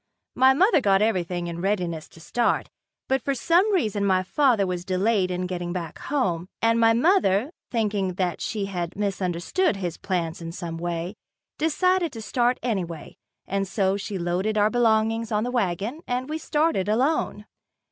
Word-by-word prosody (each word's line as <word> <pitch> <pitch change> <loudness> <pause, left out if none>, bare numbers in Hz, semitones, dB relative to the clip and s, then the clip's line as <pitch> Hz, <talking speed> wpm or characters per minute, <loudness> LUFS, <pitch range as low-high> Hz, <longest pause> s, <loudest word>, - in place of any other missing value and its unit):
My 260 +1 +5
mother 370 - +4
got 195 -2 +3
everything 180 -5 0
in 170 0 -5
readiness 180 -5 -1
to - - -16
start, 235 +8 0 0.4
but 265 0 +1
for 275 +3 -1
some 345 - +3
reason 215 - +1
my 190 -2 +2
father 240 -1 +2
was 180 -1 -3
delayed 190 +1 +1
in 180 0 -2
getting 175 -1 -4
back 170 -4 -5
home, 180 - -1
and 230 0 +3
my 225 0 +5
mother, 250 - +3 0.2
thinking 205 -5 -1
that 180 -2 -1
she 210 -3 -2
had 180 -3 -4
misunderstood 195 - 0
his 180 -4 -4
plans 170 -3 -2
in 165 0 -6
some 165 -1 -5
way, 170 +1 -3 0.5
decided 345 +3 +2
to 225 - -7
start 245 +3 +1
anyway, 180 -9 -3 0.3
and 195 0 -1
so 190 0 +1
she 200 0 -4
loaded 185 +5 -1
our 210 +1 +3
belongings 225 -1 +2
on 210 0 +1
the 245 - -2
wagon 220 - -1
and 250 +2 -2
we 310 +1 -3
started 300 - 0
alone. 240 -2 0
205 Hz, 165 wpm, -25 LUFS, 180-245 Hz, 0.5 s, My